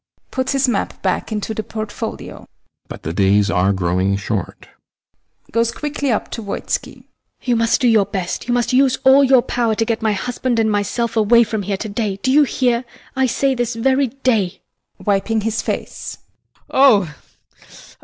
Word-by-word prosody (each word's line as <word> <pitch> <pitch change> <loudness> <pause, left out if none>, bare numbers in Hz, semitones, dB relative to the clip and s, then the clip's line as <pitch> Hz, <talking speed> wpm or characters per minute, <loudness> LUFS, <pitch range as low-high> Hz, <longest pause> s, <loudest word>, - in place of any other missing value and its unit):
[Puts 260 +1 -1
his 275 -1 +2
map 235 -5 -2
back 190 +3 -1
into 215 +1 -3
the 220 - -3
portfolio] 215 -1 -6 0.4
But - - -9
the 80 - -3
days 100 +2 +3
are 95 +1 +2
growing 95 +1 0
short. 100 - -4
HELENA. - - -33
[Goes 230 +1 +1
quickly 285 0 -2
up 215 - -2
to 230 - -5
VOITSKI] 200 -2 -4 0.4
You 245 -2 +1
must 230 0 +2
do 250 - +3
your 215 -4 +4
best; 190 +1 -4
you 240 - +1
must 245 +1 0
use 265 0 +4
all 265 +1 +6
your 260 -2 +5
power 235 -3 0
to 225 - 0
get 230 0 -1
my 220 -1 +1
husband 245 +3 -2
and 220 -1 +2
myself 225 +3 -1
away 230 +2 +5
from 220 -1 -3
here 200 0 -2
to 220 - -5
day! 205 -1 -2
Do 260 - +2
you 295 +2 +5
hear? 245 -2 0 0.3
I 265 0 +2
say, 270 +3 +1
this 240 -2 -2
very 265 +4 +2
day! 225 -7 -1 0.4
VOITSKI. - - -15
[Wiping 210 +2 +1
his 220 +1 -1
face] - - -5 0.5
Oh! 210 - +4
225 Hz, 180 wpm, -19 LUFS, 200-255 Hz, 0.5 s, all